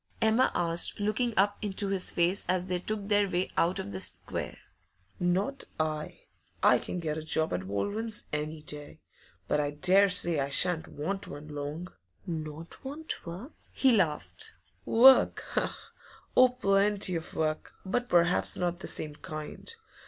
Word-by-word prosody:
Emma 225 +3 +3
asked, 170 +2 +2
looking 215 +4 0
up 205 +1 +3
into 200 -1 -1
his 195 -2 +2
face 175 +3 +1
as 180 0 0
they 180 -1 0
took 205 +2 -2
their 205 -1 +3
way 180 +1 -1
out 175 +2 +2
of 100 - -5
the 95 - -4
square. - - -4 0.6
'Not 190 +10 0
I! 155 -1 -2 0.4
I - - +6
can 180 - -5
get 160 -2 -2
a - - -7
job 160 0 0
at 90 +1 -3
Baldwin's 210 - -1
any 150 +1 -3
day. 145 -1 -7 0.5
But 150 - +1
I 145 -1 +1
dare 190 +7 +4
say 175 -4 +4
I 140 0 -1
shan't 160 +4 0
want 190 +7 -4
one 145 +1 -9
long.' 150 +4 -5 0.4
'Not 160 -1 -6
want 285 - -6
work?' 190 - -7 0.2
He 260 -3 +4
laughed. 195 - -1 0.3
'Work? 260 +3 +6 0.9
Oh, 255 0 +7
plenty 200 -5 +2
of 165 - -5
work; 155 -1 -2
but 245 +6 -1
perhaps 175 0 +3
not 175 -1 -1
the - - -6
same 150 -1 -1
kind. 155 - -7
180 Hz, 155 wpm, -29 LUFS, 155-205 Hz, 0.9 s, Oh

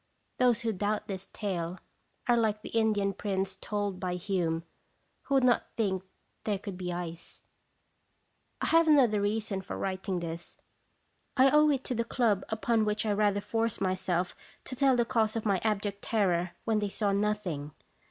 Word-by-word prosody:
Those 245 -3 +4
who 225 -1 0
doubt 210 +2 -1
this 195 -1 -5
tale 180 -4 -3 0.5
are 240 - +5
like 215 -2 +1
the - - -6
Indian 215 -3 +2
prince 195 -1 -2
told 205 0 -2
of 185 - -12
by 180 -1 -2
Hume, 175 -3 -1 0.6
who 275 - +1
would 265 - +4
not 245 -1 +3
think 195 -5 +1 0.4
thare 210 -2 0
could 200 -1 -7
be 180 -1 -4
ice. 170 -1 -6 1.2
1 - - +1
have 330 0 +5
another 250 -9 +5
reason 205 -1 -1
for - - -6
writing 190 -1 -2
this; 170 0 -6 0.8
I 265 +1 +6
owe 300 0 +6
it 270 -3 +1
to 255 - -2
the 235 -1 0
club 230 -5 +1
upon 220 +1 +1
which 210 +1 0
I 215 - +1
rather 205 -1 +2
forced 225 +1 -1
myself 185 -2 0 0.3
to 255 - -6
tell 270 0 +4
the 240 -1 +2
cause 225 -3 +1
of 225 - -2
my 195 -3 +2
abject 205 -2 -1
terror 180 -5 +1
when 220 -2 +2
they 205 -1 -1
saw 205 0 0
nothing. 195 -8 -1
205 Hz, 175 wpm, -30 LUFS, 190-225 Hz, 1.2 s, I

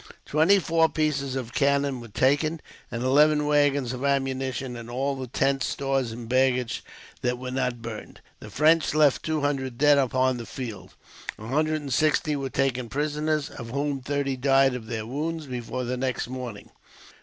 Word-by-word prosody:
Twenty 160 +7 +4
four 165 -3 +2
pieces 140 -4 -1
of 125 -3 -4
cannon 140 -2 +1
were 120 - -9
taken, 145 +8 +1 0.3
and 115 +1 -4
eleven 150 +3 +4
waggons 145 -4 +2
of 125 +1 -5
ammunition, 135 -2 -1
and 115 0 -8
all 135 +3 -1
the 130 -1 -6
tents, 135 +2 +1
stores, 135 -3 -1
and 115 0 -8
baggage 125 -1 +1 0.4
that 125 0 0
were 125 0 -6
not 125 -3 -2
burned. 115 -2 -8 0.2
The 105 - -10
French 155 +6 +3
left 150 -3 +4
two 155 -1 -1
hundred 135 -4 -1
dead 145 +1 +5
upon 130 -1 +1
the 115 - -7
field. 105 -8 -7 0.4
A 110 - -10
hundred 155 +5 0
and 140 -3 -4
sixty 155 -1 +2
were 135 -1 -3
taken 130 -3 -1
prisoners, 150 +1 -1
of 115 -3 -8
whom 140 +1 -2
thirty 140 0 -1
died 135 0 +3
of 120 -3 -6
their 110 -1 -4
wounds 155 +6 -3
before 125 -1 -4
the 125 +1 -2
next 130 -2 -2
morning. 125 -5 -7
135 Hz, 175 wpm, -26 LUFS, 125-145 Hz, 0.4 s, dead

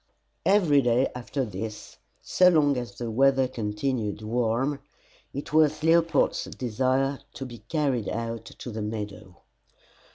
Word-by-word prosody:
Every 175 -8 +5
day 125 +1 +2
after 125 +2 -3
this, 105 +1 -7 0.3
so 180 0 +5
long 150 -5 +3
as 120 -1 -5
the 120 -2 -4
weather 135 +2 +3
continued 110 -1 -3
warm, 120 +5 0 0.5
it 140 +2 -6
was 155 0 +3
Leopold's 165 +1 +3
desire 130 +3 0 0.2
to 135 - -5
be 120 -2 -9
carried 140 -9 0
out 115 0 -4
to 120 - -9
the 110 0 -4
meadow. 105 -4 -6
125 Hz, 130 wpm, -26 LUFS, 110-140 Hz, 0.5 s, Every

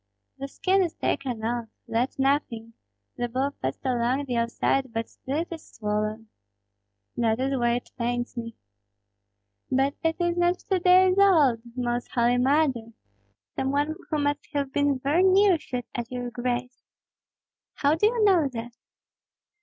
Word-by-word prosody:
"The 275 - -4
skin 380 +7 +1
is 345 -3 -1
taken 245 -5 -2
off, 235 0 -2 0.2
that's 240 +3 -1
nothing! 265 -5 0 0.4
The 240 0 -2
ball 265 +4 -1
passed 130 - -4
along 255 +2 0
the 250 -3 -3
outside; 235 +2 0
but 225 0 -3
still 280 +4 -4
it 340 - -6
is 325 -1 -9
swollen." 215 +1 -2 0.9
"That 225 -1 +1
is 270 +1 0
why 240 -2 +2
it 245 - -6
pains 240 +1 -2
me." 230 -1 -6 1.1
"But 270 +2 +2
it 325 0 +1
is 345 0 0
not 350 +1 +2
two 380 0 -1
days 370 +1 +5
old. 305 - +5
Most 240 -1 -2
Holy 240 0 +3
Mother! 260 -4 +1 0.6
some 265 - -1
one 290 +3 0 0.2
who 310 - 0
must 290 0 -1
have 280 -2 -2
been 285 -1 +2
very 285 +7 +1
near 380 -1 +5
shot 250 -4 -5
at 240 0 -5
your 245 -1 -4
grace." 250 +1 -3 0.9
"How 285 +1 +2
do 325 +7 +3
you 460 -1 +1
know 360 -7 +4
that?" 235 0 -6
265 Hz, 155 wpm, -26 LUFS, 240-310 Hz, 1.1 s, days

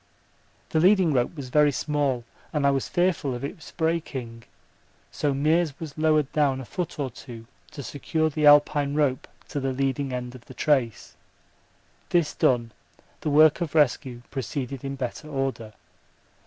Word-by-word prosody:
The 160 - +1
leading 185 -2 +4
rope 125 +5 0
was 140 -4 -7
very 150 +2 +4
small 140 -3 -1 0.3
and 150 -2 0
I 140 - +5
was 135 -1 -1
fearful 175 -7 +1
of 120 - -7
its 150 +3 -7
breaking, 135 -8 -3 0.7
so 145 - -1
Meares 155 +2 +1
was 155 -3 -7
lowered 155 -2 +2
down 140 -3 +1
a 130 - -7
foot 175 +6 -4
or 140 -4 -2
two 115 -1 -11 0.2
to 140 - -8
secure 155 +5 -1
the 150 0 +2
Alpine 145 -1 +5
rope 140 -4 +1 0.2
to 145 - -3
the 135 -1 -1
leading 135 +1 -1
end 125 -1 -4
of 125 -2 -13
the 130 - -13
trace; 130 -6 0 0.9
this 170 -4 +2
done, 120 -3 +1 0.5
the - - -2
work 155 +3 +5
of 165 -2 -3
rescue 130 -4 +1
proceeded 135 +1 -4
in 135 0 -4
better 130 +3 -5
order. 135 -6 -3
140 Hz, 160 wpm, -25 LUFS, 130-155 Hz, 0.9 s, I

